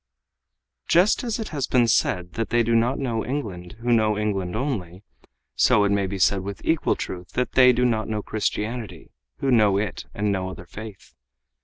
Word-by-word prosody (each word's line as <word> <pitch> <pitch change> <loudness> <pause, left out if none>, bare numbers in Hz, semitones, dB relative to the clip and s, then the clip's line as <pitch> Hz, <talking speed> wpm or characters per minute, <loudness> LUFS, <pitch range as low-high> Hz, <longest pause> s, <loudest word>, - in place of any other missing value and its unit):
Just 180 +9 +3
as 235 -3 -2
it 220 -2 -5
has 140 -5 -2
been 120 -2 +3
said 90 -5 +1
that 115 - -3
they 120 +1 +3
do 115 +1 0
not 115 +3 +2
know 120 -5 -2
England 105 -10 -5
who 120 0 +1
know 110 -2 +2
England 100 -3 -2
only, 105 - -3 0.5
so 105 - +4
it 100 - +2
may 100 -1 +1
be 100 +1 -4
said 95 +1 +2
with 100 +1 -6
equal 160 -2 +1
truth 90 -1 -7
that 125 - -1
they 125 -1 +6
do 125 0 +1
not 110 -3 0
know 105 -1 -3
Christianity 110 -3 -4 0.3
who 135 - +1
know 105 -5 +4
it 100 -2 -3
and 105 0 0
no 95 -1 -2
other 90 -1 -9
faith. 105 +2 -11
110 Hz, 190 wpm, -24 LUFS, 95-125 Hz, 0.5 s, they